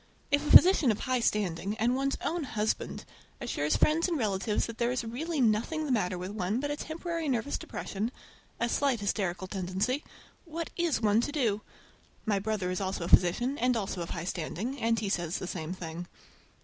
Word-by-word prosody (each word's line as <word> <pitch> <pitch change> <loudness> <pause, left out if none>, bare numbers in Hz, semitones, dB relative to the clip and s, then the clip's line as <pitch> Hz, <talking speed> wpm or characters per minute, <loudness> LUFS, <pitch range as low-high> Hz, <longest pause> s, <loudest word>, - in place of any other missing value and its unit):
If 285 0 +3
a 300 - -3
physician 355 -7 +8
of 215 - -3
high 255 -1 +1
standing, 205 -2 0
and 240 +3 +2
one's 275 +1 0
own 340 -1 0
husband, 220 -5 -2 0.3
assures 150 - 0
friends 325 +3 +3
and 340 -3 0
relatives 210 -3 0
that 230 -1 -8
there 235 0 +2
is 250 -1 -1
really 290 +8 -3
nothing 240 +7 +2
the 285 - -2
matter 185 -6 +1
with 180 +2 -5
one 205 +2 -1
but 290 +1 -1
temporary 330 0 -3
nervous 255 +2 0
depression—a 230 +2 -5
slight 265 0 +1
hysterical 190 -3 -1
tendency—what 250 - -4
is 340 -8 +1
one 210 +1 +4
to 290 - -2
do? 230 -8 +1 0.6
My 205 -3 +2
brother 200 -3 -1
is 185 - -2
also 190 -2 -2
a - - -3
physician, 240 +11 +4
and 250 -1 +2
also 195 -4 -3
of 170 - -4
high 170 -1 -4
standing, 195 - -3
and 230 0 +2
he 215 - -2
says 175 -3 -1
the - - -5
same 170 -2 -4
thing. 175 -1 -6
225 Hz, 185 wpm, -30 LUFS, 190-275 Hz, 0.6 s, physician